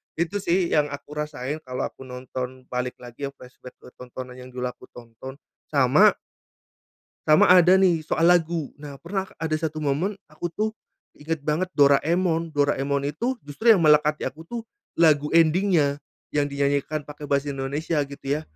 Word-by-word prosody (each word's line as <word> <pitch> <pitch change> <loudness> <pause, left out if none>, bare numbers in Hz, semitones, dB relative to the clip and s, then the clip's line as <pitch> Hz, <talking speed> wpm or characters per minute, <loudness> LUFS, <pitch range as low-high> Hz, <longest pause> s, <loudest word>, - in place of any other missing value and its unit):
itu 175 +5 -1
sih 180 -1 +1
yang 150 -1 +3
aku 145 0 -9
rasain 150 0 -4
kalau 125 0 -3
aku 130 - -13
nonton 130 0 -6
balik 125 0 -2
lagi 120 +3 -6
flashback 125 0 -14
ke - - -16
tontonan 125 0 -9
yang 125 - -10
dulu 125 - -4
aku - - -17
tonton, 120 +3 -10 0.3
sama - - +4 1.1
sama 155 +3 +6
ada 180 0 +7
nih 185 -4 +4
soal 165 +1 +2
lagu. 165 -4 +1
Nah, 145 -1 -9
pernah 190 +2 -3
ada 160 -1 -1
1 155 -1 -3
momen 155 +9 0
aku 155 +3 -5
tuh, 215 +4 -1 0.5
inget 155 0 -4
banget 155 +5 0
Doraemon, 165 +4 +3
Doraemon 140 -1 +1
itu 225 - -2
justru 150 +12 +2
yang 180 - 0
melekat 150 0 +5
di - - -3
aku 160 +2 -10
tuh, 235 +3 -5 0.3
lagu 150 -3 +4
ending-nya, 165 -3 +3 0.3
yang 145 -1 +1
dinyanyikan 140 +1 -1
pake 150 0 -8
Bahasa 140 0 0
Indonesia 140 +4 -3
gitu 140 0 -12
ya, - - -8
150 Hz, 160 wpm, -24 LUFS, 140-165 Hz, 1.1 s, ada